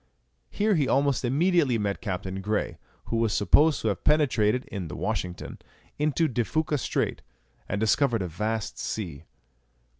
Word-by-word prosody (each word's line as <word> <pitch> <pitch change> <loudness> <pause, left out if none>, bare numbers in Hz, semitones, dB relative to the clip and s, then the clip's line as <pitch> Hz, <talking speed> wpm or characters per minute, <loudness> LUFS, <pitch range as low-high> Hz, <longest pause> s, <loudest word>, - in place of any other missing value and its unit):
Here 210 +1 +1
he 150 -7 +2
almost 140 -1 +2
immediately 145 0 +2
met 100 -2 -2
Captain 95 0 -4
Grey, 105 +2 -2 0.3
who 115 - -2
was 115 -5 +1
supposed 145 - +4
to 110 - +1
have 100 - -3
penetrated, 125 -6 +2
in 95 -4 -5
the - - -7
Washington, 90 -1 -4 0.4
into 155 +2 +2
De 120 -3 0
Fuca 155 +3 -1
Strait, - - -1 0.5
and 100 - -1
discovered 115 0 +2
a - - -3
vast 105 +5 -3
sea. 85 -8 -4
115 Hz, 150 wpm, -27 LUFS, 100-145 Hz, 0.5 s, supposed